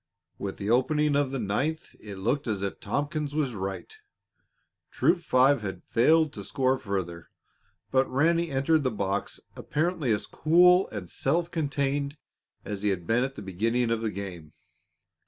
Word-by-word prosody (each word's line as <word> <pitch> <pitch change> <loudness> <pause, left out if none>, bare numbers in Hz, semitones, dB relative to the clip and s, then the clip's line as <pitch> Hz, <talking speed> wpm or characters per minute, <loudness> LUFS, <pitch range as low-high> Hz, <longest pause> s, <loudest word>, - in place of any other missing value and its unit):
With 100 -1 -4
the 100 +2 -2
opening 150 +4 +2
of 145 -2 +2
the 135 - -3
ninth 135 +9 -2
it 105 -2 -9
looked 120 +9 -1
as 105 -3 -2
if 100 - -3
Tompkins 145 +5 -2
was 145 -5 0
right. 95 - -5 0.9
Troop - - +2
Five 135 -3 +4
had 95 -2 -6
failed 155 +5 +3
to 100 - -7
score 130 +4 0
further, 90 -4 -4 0.6
but 130 0 +2
Ranny 165 +5 +2
entered 145 +3 +2
the 130 - +1
box 100 -3 -2 0.2
apparently 155 -4 -1
as 105 - 0
cool 180 +3 +4
and 100 -4 -6
self 165 - -1
contained 140 -2 -1 0.5
as 100 -1 -5
he 105 - +1
had 90 -3 -2
been 115 +6 +2
at 135 +1 -3
the - - -8
beginning 115 +6 0
of 115 -1 0
the 110 - -1
game. 90 -6 -7
130 Hz, 160 wpm, -27 LUFS, 100-150 Hz, 0.9 s, Five